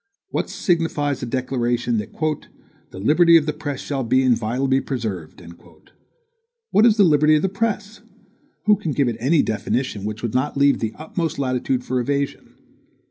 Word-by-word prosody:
What - - -2
signifies 165 - -1
a - - -4
declaration, 120 -2 -1
that 105 - -6 0.8
"the - - -12
liberty 165 - +5
of 155 - +1
the 150 - -1
press 145 -2 -5
shall 135 -2 -3
be 130 +3 +2
inviolably 130 +2 +1
preserved"? 105 - -5 1.3
What 220 +3 +5
is 220 -1 +3
the 205 - +6
liberty 155 -2 +4
of 150 - +1
the 190 - +2
press? 210 +1 -3 0.6
Who 210 0 +5
can 170 -7 -3
give 140 -2 +1
it 115 -2 -2
any 145 +6 +3
definition 110 0 -2
which 105 +2 -5
would 115 - -2
not 130 +3 -1
leave 140 0 +4
the 110 -1 -3
utmost 160 +1 -4
latitude 130 -1 -1
for 130 0 -1
evasion? 140 +2 -3
135 Hz, 165 wpm, -21 LUFS, 120-160 Hz, 1.3 s, the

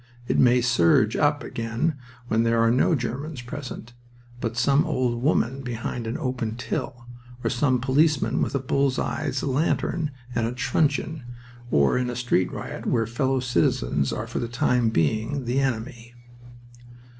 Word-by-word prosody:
It - - +1
may 125 0 +5
surge 110 -2 +3
up 145 -1 +2
again 115 +8 -2 0.3
when 110 -1 +2
there 115 0 +2
are 115 0 +4
no 130 +7 +3
Germans 130 +2 -4
present, 120 -2 -7 0.5
but 115 -1 -3
some 140 +5 +4
old 125 -7 -1
woman 135 -2 +1
behind 120 -1 -4
an 115 - -2
open 125 -6 -3
till, 120 0 -4 0.4
or - - 0
some 130 0 +2
policeman 140 +3 +2
with - - -1
a - - +2
bull's 135 0 +1
eye 155 -1 -2
lantern 150 +3 0 0.2
and 115 -2 0
a 120 - -3
truncheon, 145 +4 0 0.5
or 70 - +3
in 125 -1 -1
a 125 - -4
street 120 -7 +1
riot - - -6
where 115 - +2
fellow 130 +4 0
citizens 75 - +1
are - - -3
for - - -4
the 120 - -2
time 120 0 +1
being 110 - 0
"the 125 +3 +1
enemy." 120 -2 -3
125 Hz, 155 wpm, -25 LUFS, 115-140 Hz, 0.5 s, may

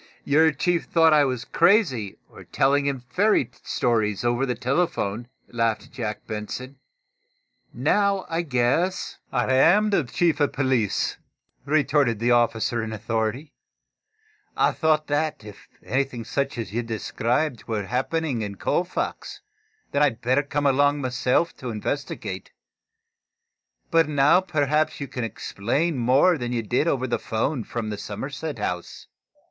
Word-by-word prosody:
"Your 160 +3 +4
chief 175 +1 0
thought 165 -2 +4
I 150 -1 +5
was 125 -3 -3
crazy, 165 - +2
or - - -14
telling 140 +1 +1
him 135 -3 -2
fairy 180 - +2
stories 110 -3 0
over 120 +3 +1
the 125 - -1
telephone," 125 - -1 0.2
laughed 115 -2 0
Captain - - -18
Jack 110 -5 -4
Benson. 125 +5 -6 0.9
"Now, 195 - +1
I 165 +1 -1
guess 145 +5 0
" - - -41
"I 130 0 +1
am 205 +11 +5
the 195 - +2
Chief 155 +5 0
of 145 -2 +1
police," 130 -7 0 0.5
retorted 145 -5 +2
the 120 +3 +1
officer 120 -1 +2
in 110 - -5
authority. 110 +6 -3 1.0
"I - - +4
thought 155 -1 +1
that, 150 -3 -1
if 105 -2 -12 0.2
anything 130 -3 -2
such 135 +3 -2
as 115 -3 -5
you 120 - 0
described 115 +4 -2
were 110 -3 -2
happening 130 - -1
in 100 -2 -4
Colfax, 175 - -2 0.5
then 140 - +1
I'd 135 -6 +2
better 130 +4 +2
come 145 0 -2
along 145 +1 +3
myself 125 +5 0
to 125 - -6
investigate. 120 +6 -4 1.4
But 165 -2 +4
now, 150 +5 +4
perhaps 155 -3 0
you 140 - -4
can 125 - -5
explain 130 +8 -2
more 135 +8 +4
than 120 -1 -3
you 120 -2 -1
did 125 +8 0
over 130 -5 +1
the 120 - -1
'phone 115 +3 -2
from 110 0 -4
the 105 - -5
Somerset 135 +7 -5
House?" 90 -4 -4
130 Hz, 145 wpm, -24 LUFS, 115-155 Hz, 1.4 s, I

